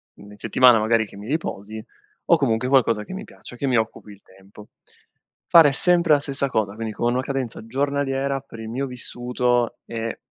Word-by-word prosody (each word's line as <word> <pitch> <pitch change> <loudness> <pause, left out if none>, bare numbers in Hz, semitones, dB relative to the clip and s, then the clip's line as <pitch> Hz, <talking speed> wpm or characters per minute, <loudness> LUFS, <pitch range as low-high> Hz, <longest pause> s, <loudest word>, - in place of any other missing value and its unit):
in 105 0 -14
settimana, 120 +3 +5
magari, 110 +1 +2
che 100 - -15
mi 100 - -9
riposi 110 -7 -4 0.4
o 170 - +5
comunque 125 -4 0
qualcosa 120 -5 +3
che 185 - -9
mi 190 - -6
piace, - - -10
che 135 +3 -3
mi 125 -2 +2
occupi 110 -1 -3
il 100 -1 -15
tempo." 95 +2 -17 0.8
Fare 160 -4 +7
sempre 170 +1 +3
la 145 - +4
stessa 140 -1 -2
cosa, 105 -5 -1
quindi 110 -1 -5
con 120 +3 0
una 130 - 0
cadenza 130 -4 -4
giornaliera, 140 +1 -1
per 120 -4 -13
il 110 0 -7
mio 130 +4 -2
vissuto, 125 -1 -1
è 115 0 -5
120 Hz, 185 wpm, -22 LUFS, 110-140 Hz, 0.8 s, Fare